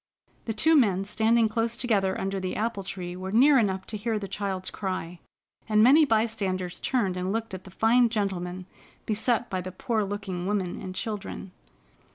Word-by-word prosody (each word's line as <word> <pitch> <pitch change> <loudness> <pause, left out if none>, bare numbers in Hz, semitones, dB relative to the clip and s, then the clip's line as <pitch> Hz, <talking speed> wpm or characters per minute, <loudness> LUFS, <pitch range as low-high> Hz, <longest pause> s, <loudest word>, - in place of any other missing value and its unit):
The 225 - -2
two 320 +9 +4
men 195 -9 +3
standing 225 +2 +2
close 225 +1 -1
together 200 -6 +1
under 195 0 -2
the 185 -1 -3
apple 220 -2 -2
tree 180 -2 -6
were 185 +1 -5
near 265 +5 +6
enough 190 -4 0
to 215 - -4
hear 220 +1 -1
the 200 -1 -5
child's 195 -1 -3
cry, 185 -3 -4 0.5
and 215 0 +5
many 295 +6 +7
bystanders 205 -7 -1
turned 210 -8 0
and 185 +1 -2
looked 225 -1 -3
at 190 0 -7
the - - -10
fine 235 +5 +3
gentleman 185 -4 -3 0.4
beset 230 +2 0
by 185 -1 -3
the 185 +1 -6
poor 220 +3 -1
looking 195 -3 -4
woman 195 -4 -2
and 185 0 -7
children. 205 -2 -5
205 Hz, 180 wpm, -27 LUFS, 185-225 Hz, 0.5 s, many